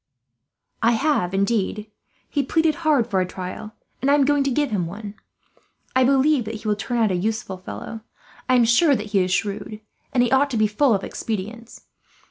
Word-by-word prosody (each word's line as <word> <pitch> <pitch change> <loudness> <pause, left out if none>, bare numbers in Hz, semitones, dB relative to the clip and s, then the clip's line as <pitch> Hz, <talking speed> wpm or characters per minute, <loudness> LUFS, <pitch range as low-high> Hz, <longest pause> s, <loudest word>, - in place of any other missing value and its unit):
"I 230 +1 +4
have, 235 - +1
indeed. 210 +1 -1 0.4
He 285 - 0
pleaded 320 +3 +1
hard 300 -7 +3
for 195 -5 0
a - - 0
trial, 185 +4 -7 0.3
and 265 - +1
I 285 - +6
am 285 -2 +3
going 290 0 +2
to - - +2
give 285 0 0
him 185 -5 -1
one. 205 +3 -8 0.8
I 260 - +5
believe 270 0 +3
that 220 +1 -5
he 215 0 -7
will 210 - +2
turn 240 +4 -3
out 220 -3 +2
a - - 0
useful 215 +1 -2
fellow. 220 +4 -8 0.5
I 255 - +5
am 240 -2 +5
sure 275 +6 +4
that 210 -2 -5
he 200 - +3
is 185 0 0
shrewd, 205 +2 -2 0.3
and 245 - +3
he 240 - 0
ought 275 +2 +3
to 245 - -2
be 215 - +3
full 215 +3 +2
of 195 - -3
expedients. 225 +2 -6
225 Hz, 205 wpm, -22 LUFS, 205-265 Hz, 0.8 s, I